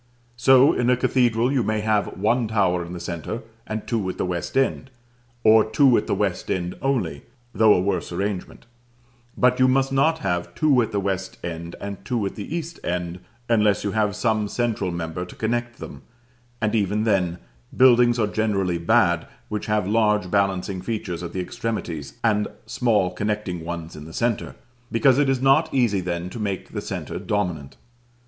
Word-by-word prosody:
So 130 +3 +6
in 120 0 +1
a 125 - +4
cathedral 120 -1 +2
you 135 -3 +2
may 110 -1 0
have 105 -1 0
one 115 +4 +1
tower 95 -5 +1
in 85 - -9
the 90 - -6
centre, 85 - -5 0.2
and 110 0 -4
two 110 -6 -1
at - - -5
the - - -1
west 90 +6 -3
end; 135 -1 0 0.5
or 110 0 +7
two 120 +4 +4
at - - 0
the - - +1
west - - -2
end 90 -1 -1
only, 115 - -1 0.3
though 110 0 +5
a - - +2
worse 95 -2 -1
arrangement: 95 +1 -4 0.7
but 125 0 +3
you 130 - +5
must 135 +1 +2
not 155 +4 +3
have 90 - -3
two 145 -5 +4
at 115 -1 -2
the 105 - 0
west 95 -1 -3
and 85 0 -5 0.3
two 110 0 -1
at 95 - -3
the 110 +9 -6
east 170 0 -5
end, 90 0 -3 0.3
unless 105 -4 +2
you 100 - -1
have 105 -2 0
some 110 -1 0
central 110 -4 -1
member 85 0 -4
to 90 - -10
connect 120 +1 -2
them; - - -9 0.6
and 110 -1 0
even 105 -1 +1
then, 95 -6 +1 0.4
buildings 120 -2 +6
are 110 - +2
generally 100 -5 0
bad 85 -2 +2 0.2
which 105 -1 -4
have 105 -3 +1
large 105 -3 +2
balancing 95 -2 0
features 95 -4 -4
at 85 -1 -5
the 95 - -4
extremities, 85 - -4
and 105 -2 +2 0.2
small 105 -7 +1
connecting 105 -5 -3
ones 85 -1 -6
in 75 - -9
the 80 - -11
centre, 120 +2 -1 0.4
because 130 +4 +4
it 145 -2 +3
is 130 -1 0
not 155 +4 +4
easy 120 -7 +2
then 85 0 -3
to 95 - -8
make 100 -3 -3
the - - -4
centre - - -5
dominant. 85 -10 -3
105 Hz, 180 wpm, -23 LUFS, 90-120 Hz, 0.7 s, or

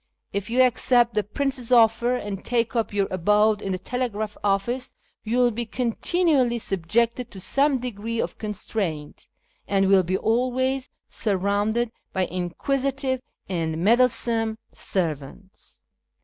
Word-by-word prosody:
If 200 +2 -3
you 255 +2 +4
accept 245 -1 +3
the 210 - +2
prince's 255 +2 -3
offer 235 +1 +4
and 205 -5 -5
take 235 -1 0
up 230 -2 0
your 200 -1 +1
abode 210 +3 +3
in 195 - -3
the 185 - -1
telegraph 215 0 -3
office, 205 +6 -1 0.3
you 230 +3 -1
will 245 -1 +4
be 235 +1 -4
continually 255 +2 +1
subjected 230 +5 0
to 195 - -10
some 275 +8 +2
degree 230 -2 -4
of - - -3
constraint, 195 -7 -4 0.4
and 195 -1 +2
will 195 -1 +6
be 185 +1 -1
always 255 +4 0 0.2
surrounded 205 +3 0 0.2
by 185 -1 +1
inquisitive 260 +9 -2 0.3
and 165 -4 -2
meddlesome 230 -1 +2 0.2
servants. 170 +2 -4
225 Hz, 130 wpm, -24 LUFS, 195-250 Hz, 0.4 s, will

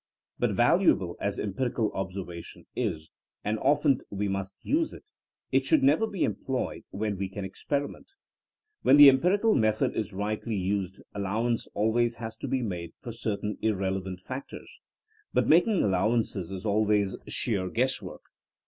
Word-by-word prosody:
But - - +1
valuable - - +3
as - - -1
empirical 110 +2 -1
observation 95 -3 -6
is, 85 -10 -3 0.3
and 105 +1 -1
often 140 -1 +3
as - - -17
we 100 0 -2
must 95 0 -3
use 315 +2 +1
it, - - -11 0.5
it - - +3
should 310 -4 +3
never 245 -5 +4
be 195 -5 0
em - - 0
ployed 130 -2 -4
when 105 -1 -3
we 95 -1 -2
can 95 0 -5
experiment. 145 - -4 0.7
When 135 - +6
the 145 -1 +11
em 135 0 +4
pirical 205 +6 +3
method 110 -1 +2
is 110 0 -2
rightly 105 +3 -3
used 95 0 -2
allowance 110 +4 -1
always 115 +3 +2
has 110 -1 -6
to - - -5
be 130 -2 0
made 85 -6 -4
for 120 - -7
certain 105 -2 -3
irrelevant 95 -3 -1
factors. 130 +7 -8 0.6
But - - +3
making 180 +5 +4
allowances*^ 100 -1 0
is 95 +1 -6
always 105 -1 +2
sheer 95 -6 -1
guess 130 +6 0
work. - - -9
110 Hz, 155 wpm, -28 LUFS, 95-130 Hz, 0.7 s, the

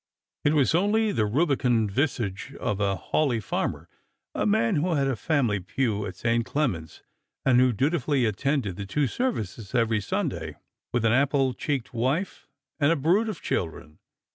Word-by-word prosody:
It 145 +2 +3
was 140 -1 +3
only 210 +5 +2
the 110 -4 +1
rubicund 125 - +1
visage 115 -6 -2
of 105 - -2
a 100 -1 +1
Hawleigh 125 - 0
farmer, 105 - -3 0.5
a 105 - 0
man 115 +6 +2
who 170 +3 +1
had 140 -2 +1
a 135 - 0
family 120 -5 +1
pew 105 +2 -1
at - - -7
St. 115 0 +1
Clement's, 100 - -2 0.4
and 130 -2 +5
who 130 0 +5
dutifully 140 - +1
attended 110 -2 -1
the 100 -1 -5
two 145 +9 +1
ser 250 - 0
vices 105 - -6
every 115 -3 +2
Sunday, - - -3 0.4
with 120 -2 0
an 110 - +4
apple 135 0 +2
cheeked 135 -2 -3
wife 135 +11 -1 0.3
and 145 +1 +4
a - - +3
brood 180 +10 +2
of 205 - -6
children. 80 -2 -3
125 Hz, 165 wpm, -26 LUFS, 105-150 Hz, 0.5 s, and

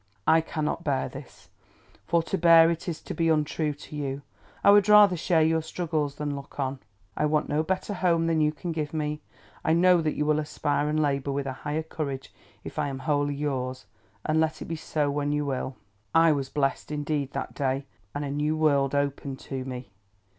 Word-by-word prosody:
I 160 0 +5
cannot 160 +1 -3
bear 140 -4 0
this, 135 +1 -12 0.6
for 170 0 +2
to 165 - -2
bear 165 -2 +7
it 170 +2 -4
is 160 - -5
to - - -5
be 165 -1 +1
untrue 155 0 +1
to 150 - -11
you. 140 -1 -3 0.4
I - - +8
would 205 0 +5
rather 210 -3 +8
share 165 -1 +2
your 160 0 +2
struggles 155 -3 -2
than 145 -1 -3
look 140 +1 -10
on. 135 0 -2 0.4
I 150 - +1
want 150 0 +1
no 150 - +2
better 190 +5 -2
home 170 -3 +2
than 165 -1 +2
you 150 0 +3
can 165 +3 -5
give 155 -1 -3
me. 150 0 -2 0.4
I 160 - +2
know 180 +1 +5
that 155 -1 -1
you 150 - 0
will 150 0 +2
aspire 145 -1 -1
and 155 +1 +1
labour 140 -2 0
with 140 0 -2
a 135 - -3
higher 150 +4 -3
courage 140 -4 -5 0.3
if - - -6
I - - +1
am 135 -1 -4
wholly 145 -2 +1
yours, 130 -5 -3 0.4
and 155 +1 +2
let 160 0 0
it - - -6
be 165 - -4
so 150 -2 -1
when 145 0 -1
you 150 0 0
will!" 130 -1 -3 0.4
I 165 0 +6
was 140 -3 -1
blest 135 -2 -1
indeed, 145 -2 -2
that - - -4
day, 135 0 -1 0.3
and 145 0 -2
a 140 - -3
new 150 +2 0
world 145 -3 +2
opened 140 -1 -1
to 130 -2 -5
me. 125 -4 -7
150 Hz, 210 wpm, -27 LUFS, 140-160 Hz, 0.6 s, I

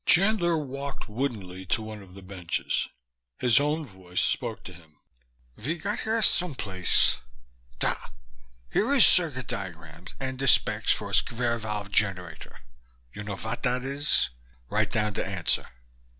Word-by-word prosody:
Chandler 180 -3 +4
walked 140 -2 -5
woodenly 105 -6 -3
to 110 +4 +1
one 110 -1 -7
of 95 -1 -14
the 100 - -11
benches. 90 -3 -2 0.5
His 125 +1 +5
own 150 +2 0
voice 95 -6 -5
spoke 115 -3 -1
to 90 - -9
him. 80 -3 -18 0.6
"Ve 145 +10 -2
got 200 +6 -3
here 220 +1 0
someplace 110 - +2 0.6
da, - - +1 0.8
here 230 +6 +2
is 260 - +9
cirguit 145 -8 +4
diagrams 85 -4 -7
and 130 -1 -4
de 135 - 0
specs - - +4
for - - -1
a - - -9
sqvare 115 0 +1
vave 105 -2 -4
generator. 95 -5 -1 0.5
You 105 - -6
know 100 -1 -3
vot 110 +4 -4
dat 125 -1 0
is? 140 - +1 0.4
Write - - +2
down 105 -1 0
de - - -1
answer." - - -1
115 Hz, 150 wpm, -27 LUFS, 95-140 Hz, 0.8 s, is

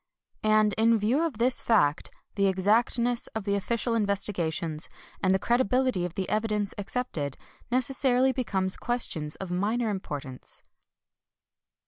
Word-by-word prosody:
And 215 -1 +3
in 230 +1 +5
view 225 +8 +1
of 315 -10 -2
this 250 +3 +2
fact, 160 -9 +2 0.2
the 200 -1 +2
exactness 230 +5 +2
of 220 - -2
the 200 0 -1
official 230 +4 -1
investigations, 180 -7 -1 0.3
and 190 - +3
the 190 - +4
credibility 240 -2 +1
of 175 - -6
the 190 - -2
evidence 210 -1 -1
accepted, 195 - -2 0.3
neces 260 +2 +1
sarily 260 0 +4
become 200 -8 -1
questions 165 -11 -1
of 190 -2 -6
minor 215 +5 0
importance. 145 -9 -6
210 Hz, 130 wpm, -27 LUFS, 190-240 Hz, 0.3 s, in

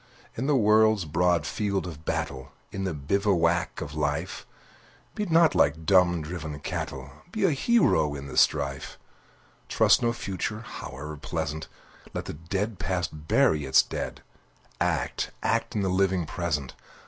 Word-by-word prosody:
In 130 +4 -2
the 150 - +3
world's 110 -3 +4
broad 85 0 +2
field 100 -3 -1
of 80 -3 -9
battle, 65 -1 -3 0.2
In 95 0 -3
the 90 - -1
bivouac 85 +2 +1
of 70 - -6
Life, 75 +4 -2 0.7
Be 210 -1 -3
not 165 -1 +5
like 80 +3 +2
dumb, 90 -3 +4
driven 80 -2 -6
cattle! 65 -2 -5 0.2
Be 215 0 -2
a 185 - +4
hero 130 - +3
in 70 -1 -7
the 65 - -8
strife! 70 -2 +1 0.7
Trust - - +4
no 120 - +2
future, 110 -1 -4
howe'er 75 - -7
pleasant! 75 +2 -4 0.5
Let - - -3
the - - -5
dead 95 +6 -3
Past 90 -5 -3
bury 75 -2 +3
its 65 - +5
dead! - - -5 0.6
Act, - - -1
act - - 0
in 105 - +1
the - - 0
living 95 -2 +1
present! 75 -5 -3
85 Hz, 150 wpm, -27 LUFS, 75-100 Hz, 0.7 s, not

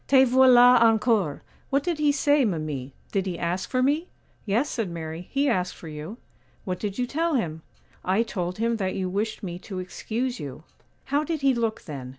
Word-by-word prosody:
'Te 265 -1 +6
voilà 250 -1 +7
encore! 220 - +3 0.3
What 275 0 +1
did 345 -3 -1
he 295 -1 +4
say, 285 0 +3
mimi? 155 - -2 0.2
did 195 -1 0
he 175 -2 -3
ask 175 +3 -2
for 255 -1 +1
me?' 300 +6 +1 0.4
'Yes,' 230 +8 +2
said 225 -6 -2
Mary, 165 +1 -6
'he 280 +1 +1
asked 185 -8 0
for 165 - -11
you.' 155 +8 -7 0.5
'What 180 -2 -3
did 200 -2 -4
you 250 - +1
tell 325 +5 0
him?' 160 -10 -2 0.4
'I 190 +5 +2
told 180 -5 -4
him 230 +1 0
that 190 -3 -2
you 190 -1 -1
wished 215 +4 -2
me 175 -2 -5
to 190 0 -8
excuse 230 +7 -3
you.' 145 +2 -7 0.4
'How 285 +2 +1
did 315 -1 -3
he 275 -1 +4
look 230 -2 -1
then? 135 -5 -7
220 Hz, 195 wpm, -25 LUFS, 180-260 Hz, 0.5 s, voilà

